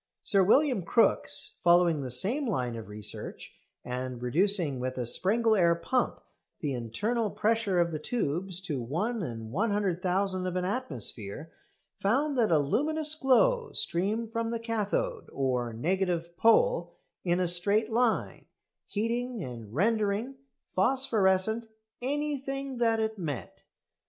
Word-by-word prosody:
Sir 195 -3 +4
William 255 +2 +3
Crookes, 225 +7 +1
following 170 -3 +4
the 130 - -5
same 225 - +4
line 125 - -1
of 115 -1 -8
research, 105 0 -7 0.3
and 125 0 -4
reducing 155 +2 +1
with 130 +1 -3
a 125 - -2
Sprengel 220 - +2
air 170 -4 +4
pump 250 +9 -1 0.4
the 145 -3 -2
internal 210 - -2
pressure 215 -3 +1
of 170 -1 +2
the 155 - -3
tubes 180 -1 -2
to 150 -9 -4
1/100000 185 - -1
of 180 - -3
an 180 0 -1
atmosphere, 150 - -3 0.5
found 275 +8 +1
that 235 -4 +2
a 160 - +5
luminous 300 - +2
glow 450 - +2
streamed 215 +6 -1
from 230 0 -2
the 230 - -2
cathode, 230 - -2
or 125 -3 -1
negative 170 +6 -1
pole, 485 - +3 0.3
in 175 0 +1
a 180 - +1
straight 200 +6 +3
line, 235 0 0 0.4
heating 235 +1 -2
and 115 -6 -8
rendering 210 - 0 0.4
phosphorescent 220 -1 +2 0.3
anything 275 -1 -3
that 225 -2 +2
it 220 -1 -2
met. 145 -8 -6
195 Hz, 125 wpm, -29 LUFS, 160-230 Hz, 0.5 s, a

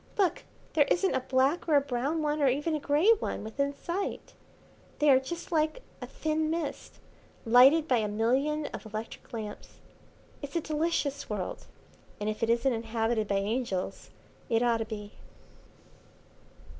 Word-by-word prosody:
Look, 385 -4 +1 0.3
there 290 -3 +4
isn't 380 +2 +2
a 260 - +2
black 265 +6 +1
or 305 - +4
a - - +8
brown 280 +4 -2
one, 300 0 0
or 280 - +4
even 290 +5 +1
a 305 - 0
grey 300 +9 +4
one, - - -3
within 280 +6 -1
sight. 345 +7 -4 0.6
They 295 -1 +5
are 260 - +6
just 335 +7 -7
like 315 +8 0 0.2
a - - -5
thin 310 0 -1
mist, 320 -3 -4 0.5
lighted 265 +7 +6
by 255 - +3
a 215 - 0
million 260 +8 +1
of - - -6
electric 215 +1 -7
lamps. 215 -3 -7 0.7
It's 285 +1 -7
a - - +3
delicious 305 -2 -1
world, 205 -4 -4 0.5
and 210 - -3
if 215 - -8
it 230 - +1
isn't 240 +3 +2
inhabited 225 -1 -1
by 200 - 0
angels 200 -1 -2 0.4
it 230 0 +2
ought 235 -1 +3
to 225 - -3
be." 210 -2 -8
270 Hz, 160 wpm, -29 LUFS, 225-310 Hz, 0.7 s, a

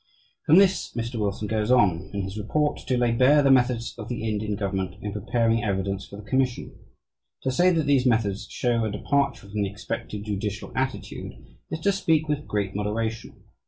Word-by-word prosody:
From 160 - +7
this 195 -1 +3
Mr. 115 0 -3
Wilson 105 0 -2
goes 110 +1 -1
on, 95 -8 +3
in 100 -1 -3
his 95 +1 -6
report, 145 +8 0
to 130 - +1
lay 120 -1 +2
bare 130 +5 +5
the 135 - +5
methods 125 -2 +2
of 105 - -7
the 115 -2 -3
Indian 105 -1 -1
government 95 -2 -2
in 105 -1 -5
preparing 115 +2 +1
evidence 100 -1 -2
for - - -10
the 100 0 -11
commission. 130 -1 -1 0.7
To 130 - +1
say 175 +7 +4
that 165 -4 +1
these 135 -3 +3
methods 110 -4 +1
show 120 -2 0
a 110 - 0
departure 135 +2 -1
from 105 +1 -3
the 100 - 0
expected 100 +1 -5
"judicial 105 0 -4
attitude" 130 0 -3 0.4
is 160 - -4
to 200 - +3
speak 160 -5 +1
with 150 0 -2
great 100 -2 -1
moderation. 110 +2 -3
115 Hz, 190 wpm, -25 LUFS, 105-130 Hz, 0.7 s, From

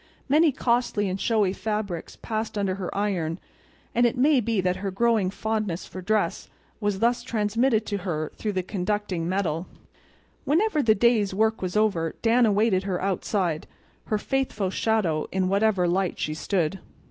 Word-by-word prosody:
Many 305 +3 +4
costly 235 -5 0
and 185 +1 -3
showy 210 -5 +2
fabrics 200 -4 -4
passed 220 -1 -3
under 195 -2 0
her 185 -1 -4
iron; 180 -6 -1 0.6
and 240 - +3
it 245 - -3
may 280 +2 +4
be 225 -2 0
that 180 0 +1
her 195 +1 -3
growing 215 -1 +2
fondness 210 -3 -2
for 185 - -8
dress 205 -2 0 0.3
was 205 -2 0
thus 235 +3 +2
transmitted 225 0 +1
to 205 - -2
her 160 -5 -3
through 210 -2 -3
the 185 -1 -1
conducting 185 -2 -2
metal. 180 -3 -1 0.8
When 295 - +2
the 305 - +3
day's 215 -3 +2
work 220 +2 +1
was 185 +2 -2
over 175 -7 +1
Dan 235 +1 +4
awaited 205 -2 +3
her 190 -2 -2
outside, 185 -3 -1 0.4
her 215 - 0
faithful 220 -5 -1
shadow 195 -9 0
in 190 -1 0
whatever 200 -2 +2
light 185 +1 0
she 155 - -2
stood. 180 +2 -1
205 Hz, 160 wpm, -25 LUFS, 185-225 Hz, 0.8 s, Many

